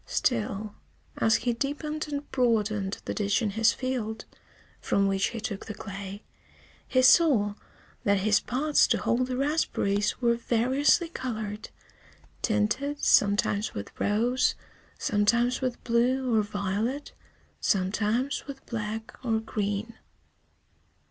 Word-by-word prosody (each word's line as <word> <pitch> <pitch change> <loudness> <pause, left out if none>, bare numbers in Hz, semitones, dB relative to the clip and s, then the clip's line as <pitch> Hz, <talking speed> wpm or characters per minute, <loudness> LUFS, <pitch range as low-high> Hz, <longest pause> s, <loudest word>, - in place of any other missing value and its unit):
Still, 200 - -1 0.4
as 225 0 +3
he 240 +1 0
deepened 300 +5 -3
and 285 0 -4
broadened 215 -5 +1
the - - -2
ditch 205 +2 0
in 210 - 0
his 220 +2 +3
field, 235 -4 -3 0.5
from 200 - +1
which 195 0 +1
he 235 - -5
took 205 -2 -5
the 215 - -6
clay, 200 0 -7 0.6
he 255 0 +2
saw 255 -8 +5 0.5
that 200 -1 +2
his 210 +1 +4
pots 285 +5 +2
to - - +2
hold 250 +1 0
the 255 -1 -3
raspberries 210 -8 0
were 235 -2 +3
variously 255 +8 +2
colored, 220 -8 -5 0.7
tinted 235 +7 0
sometimes 205 +1 +3
with 100 - -6
rose, 235 +5 +2 0.4
sometimes 235 +5 +2
with 255 -2 -3
blue 245 +2 +1
or 215 - +4
violet, 205 +7 -3 0.5
sometimes 210 +9 0
with 275 -1 -9
black 220 +1 -5
or 225 -3 +1
green. 210 0 -3
225 Hz, 120 wpm, -27 LUFS, 205-255 Hz, 0.7 s, saw